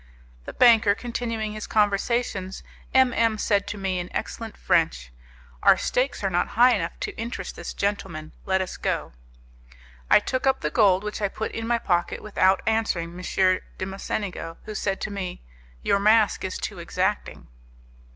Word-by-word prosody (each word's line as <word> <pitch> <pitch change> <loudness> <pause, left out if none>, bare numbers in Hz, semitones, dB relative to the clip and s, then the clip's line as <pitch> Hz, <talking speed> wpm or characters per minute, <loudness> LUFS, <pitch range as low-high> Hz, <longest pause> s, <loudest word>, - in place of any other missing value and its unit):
The - - -7
banker 225 -4 +5
continuing 230 -3 -3
his 215 0 -6
conversations, 205 -2 0 0.3
M 260 -2 +4
M 230 -2 +2
said 200 -1 +1
to 205 - -4
me, 190 -2 -1
in 175 - -5
excellent 225 -2 -5
French, - - +1 0.5
"Our - - +6
stakes 250 -3 -1
are 195 - +2
not 175 - +1
high 245 +1 +7
enough 170 -4 -4
to - - -4
interest 225 -5 -5
this 170 - -6
gentleman; 190 -6 -3
let 190 0 +1
us 185 - -7
go." - - -2 1.0
I - - +8
took 255 +1 -2
up 265 - +2
the - - -1
gold, 200 -4 +4
which 210 0 -5
I 205 - +2
put 220 +3 -4
in 225 0 -4
my 235 0 +2
pocket, 175 -6 -1
without 190 -2 +2
answering 220 -7 0
M. 185 +1 +1 0.2
de - - -3
Mocenigo, 190 -3 -4
who 215 - -6
said 195 -2 -2
to 215 - -3
me: 185 - -5 0.4
"Your 200 - +2
mask 215 +1 +4
is 190 - -3
too - - -5
exacting." - - -2
205 Hz, 170 wpm, -25 LUFS, 185-225 Hz, 1.0 s, I